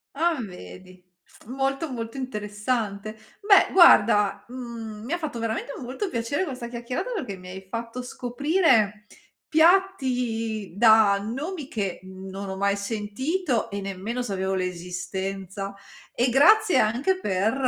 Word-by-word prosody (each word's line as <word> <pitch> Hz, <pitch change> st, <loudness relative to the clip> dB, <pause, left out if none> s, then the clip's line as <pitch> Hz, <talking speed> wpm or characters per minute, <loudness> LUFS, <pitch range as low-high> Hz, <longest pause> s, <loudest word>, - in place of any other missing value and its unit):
A 330 Hz, +1 st, +1 dB
vedi, 180 Hz, -, -11 dB, 0.4 s
molto, 270 Hz, +4 st, -2 dB
molto 230 Hz, 0 st, -5 dB
interessante. 210 Hz, -3 st, -3 dB, 0.3 s
Beh 400 Hz, -2 st, +5 dB
guarda, 205 Hz, -, +6 dB
mhmm, 235 Hz, -4 st, -7 dB
mi 285 Hz, -, -3 dB
ha -, -, +1 dB
fatto 305 Hz, -7 st, -4 dB
veramente 230 Hz, +5 st, -3 dB
molto 265 Hz, -, -4 dB
piacere 240 Hz, +7 st, -1 dB
questa 255 Hz, -5 st, -6 dB
chiacchierata 240 Hz, -, -4 dB
perché 205 Hz, -, -4 dB
mi 180 Hz, 0 st, -11 dB
hai 190 Hz, +1 st, -9 dB
fatto 230 Hz, +3 st, -5 dB
scoprire 250 Hz, -, +1 dB, 0.4 s
piatti 250 Hz, -, +2 dB
da 220 Hz, -3 st, +6 dB
nomi 275 Hz, -, -5 dB
che 200 Hz, -8 st, -3 dB
non 190 Hz, +1 st, -8 dB
ho 190 Hz, -, -4 dB
mai 200 Hz, +1 st, +1 dB
sentito 230 Hz, -, -2 dB
e 200 Hz, -1 st, -4 dB
nemmeno 195 Hz, +6 st, -4 dB
sapevo 190 Hz, -4 st, -2 dB
l'esistenza. 190 Hz, +2 st, -4 dB, 0.4 s
E 245 Hz, +1 st, +1 dB
grazie 390 Hz, -, +5 dB
anche 260 Hz, -, +1 dB
per 200 Hz, -, 0 dB
230 Hz, 125 wpm, -25 LUFS, 200-270 Hz, 0.4 s, guarda